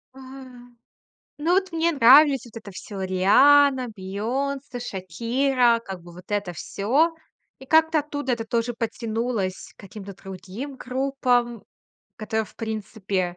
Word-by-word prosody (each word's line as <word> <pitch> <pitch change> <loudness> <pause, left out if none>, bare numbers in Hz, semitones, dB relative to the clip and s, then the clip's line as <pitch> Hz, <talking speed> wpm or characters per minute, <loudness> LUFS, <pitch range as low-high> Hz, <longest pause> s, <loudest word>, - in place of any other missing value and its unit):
Ам, 255 -2 -13 0.6
ну, 330 +4 0
вот 380 -2 0
мне 330 +1 +1
нравились 275 +1 +6
вот 235 -1 -15
это 200 - -11
всё: 195 +1 -8
Рианна, 255 +8 +4
Бейонсе, 245 +7 -4
Шакира- 235 +5 0
как 190 -3 -7
бы 175 0 -13
вот 180 +1 -13
это 205 -3 -2
всё. 265 - 0 0.4
И 265 - -12
как-то 320 0 +4
оттуда 290 -3 -3
это 230 -1 -2
тоже 235 +1 -1
подтянулось 225 -3 -3
к - - -16
каким-то 200 0 -10
другим 195 +9 -8
группам, 250 -3 -1 0.5
которые, 220 0 -2
в - - -19
принципе, 200 -5 -3
235 Hz, 130 wpm, -24 LUFS, 200-270 Hz, 0.6 s, нравились